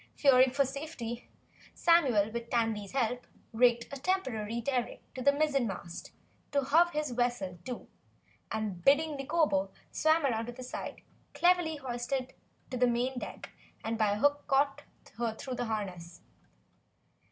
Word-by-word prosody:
Fearing 260 -2 +6
for 275 +2 +2
her - - -3
safety, 265 -4 -6 0.5
Samuel 260 -12 +4
with 235 0 -5
Tandy's 225 -4 0
help 245 -2 -1 0.3
rigged 235 0 +4
a - - -3
temporary 240 - -1
derrick 245 0 -2
to 260 - -6
the 280 - +5
mizzenmast, 275 - -1 0.5
hove 300 +5 +4
his 300 -4 -2
vessel 240 -7 -1
to, 250 -2 -6 0.6
and 210 -5 -3
bidding 300 +2 +4
Nikobo 275 - +1 0.2
swim 315 +1 +3
round 230 -4 0
to 245 - -5
the 255 +1 -9
side, 250 - -6 0.3
cleverly 350 0 +3
hoisted 255 -1 -3
her - - -31 0.3
to 255 - -2
the 250 0 +4
main 245 +2 0
deck - - -8 0.3
by 220 -2 +1
a - - -2
hook 290 +5 +2
caught 275 0 +2 0.2
through 235 +2 -4
her 245 - -1
harness. 180 -6 -5
250 Hz, 140 wpm, -31 LUFS, 225-285 Hz, 0.6 s, Fearing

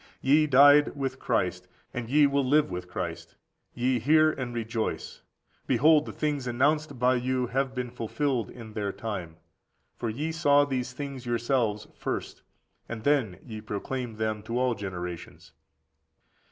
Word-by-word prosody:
Ye 150 +3 +4
died 145 +2 +6
with 135 -2 -3
Christ; - - -1 0.3
and 120 -2 -4
ye 145 +2 +5
will 140 0 +2
live 150 +3 +3
with 90 0 -5
Christ. 85 -2 -5 0.4
Hear 125 +1 +1
ye, 155 +4 +4
and 125 -1 -3
rejoice; 115 -1 -3 0.5
behold 155 +1 +4
the - - -4
things 145 -4 -2
announced 145 +4 +1
by 125 +1 +3
you 130 0 0
have 130 +2 -1
been 125 -1 -3
fulfilled 125 0 -2
in 115 -3 -10
their 105 -2 -2
time. 95 -5 -5 0.6
For 115 - -3
ye 150 +9 -3
saw 145 -3 +4
these 130 -2 -2
things 135 -2 -6
yourselves 120 -3 0
first, - - -5 0.5
and 110 -2 -6
then 130 -10 +2
ye 110 -4 -7
proclaimed 110 +2 -4
them 110 -1 -1
to 115 +3 -4
all 125 -1 +2
generations. 90 -4 -7
125 Hz, 150 wpm, -27 LUFS, 110-140 Hz, 0.6 s, died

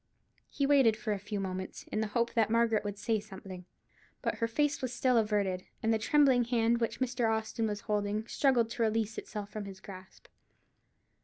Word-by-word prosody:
He 280 - -1
waited 270 -6 +5
for 220 -2 -2
a 200 - -3
few 205 +1 -4
moments, 185 -1 -5
in 215 - 0
the 220 - 0
hope 235 +2 0
that 225 -2 +2
Margaret 230 -1 +2
would 205 -1 -4
say 225 0 0
something; 190 -3 -10 0.6
but - - -1
her 230 - +1
face 290 +5 0
was 255 -2 -2
still 250 +1 +2
averted, 205 -4 +1 0.2
and 225 0 +3
the 220 - +1
trembling 260 0 +4
hand 235 -1 +2
which 230 0 -2
Mr. 245 -3 0
Austin 220 0 -1
was 205 -1 -3
holding 210 +1 -1
struggled 240 -3 +2
to 240 - -4
release 220 -1 0
itself 205 -2 -7
from 215 -1 -5
his 195 -1 -9
grasp. 185 -1 -12
220 Hz, 190 wpm, -31 LUFS, 205-235 Hz, 0.6 s, waited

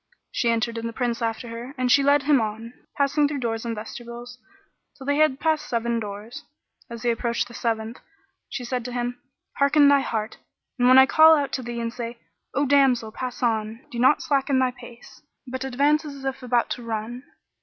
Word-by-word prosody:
She 235 - 0
entered 230 0 0
and 230 0 -4
the - - -9
Prince 240 -1 -2
after 230 +1 -3
her, 235 +4 -8
and 255 -1 +1
she 280 - +6
led 285 0 +3
him 285 -3 +4
on, 220 +2 -5 0.2
passing 290 +1 +2
through 290 0 -3
doors 225 -1 -2
and 230 -1 -2
vestibules, 240 +3 -9 0.6
till 265 - -10
they 285 +1 +1
had 305 -3 +3
passed 315 -1 0
seven 235 0 0
doors.[FN#45] 210 +2 -10
As 230 - -10
they 240 - +2
approached 235 0 -1
the 235 - -13
seventh, 225 0 -3 0.5
she 250 -2 -5
said 250 0 -2
to 250 - -5
him, 245 0 -3 0.4
"Hearten 285 +1 +5
thy 285 0 +5
heart 220 -4 -3 0.4
and 245 - +4
when 255 +1 +7
I 265 - +9
call 315 +3 +7
out 280 -2 -2
to 260 - -2
thee 240 -1 -5
and 230 0 -3
say, 235 -1 -6 0.4
'O 285 +2 +2
damsel 260 -5 +3
pass 255 +3 -6
on!' 220 0 -1
do 240 - -5
not 260 +4 +4
slacken 275 -2 +1
thy 260 -1 +2
pace, 245 -1 -14 0.2
but 260 +1 -5
advance 285 +4 +2
as 280 -3 -8
if 270 0 -3
about 245 -1 0
to - - -3
run. 230 +1 -4
245 Hz, 205 wpm, -24 LUFS, 230-275 Hz, 0.6 s, I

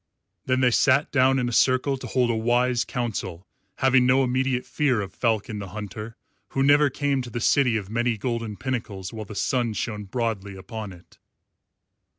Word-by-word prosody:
Then 130 0 +2
they 125 -1 +4
sat 140 +4 +3
down 135 -1 +4
in 125 -2 0
a - - -2
circle 130 +3 +3
to 130 - -8
hold 125 -2 +1
a - - -1
wise 120 +1 +1
council, 100 -7 -4 0.3
having 130 -1 +3
no 130 +1 +4
immediate 130 0 0
fear 135 -6 +1
of 95 -2 -5
Falcon 110 -2 -1
the 100 - -6
Hunter, 105 +3 -7 0.3
who 135 - 0
never 145 +1 +5
came 140 0 -1
to 125 - -7
the 120 - -4
city 125 0 +3
of 100 -3 -5
many 120 0 0
golden 115 -2 -3
pinnacles 105 -7 -4
while 110 -1 -6
the 105 - -9
sun 120 0 0
shone 105 -1 -4
broadly 100 -2 -3
upon 100 +2 -7
it. 90 -1 -17
120 Hz, 180 wpm, -25 LUFS, 105-130 Hz, 0.3 s, never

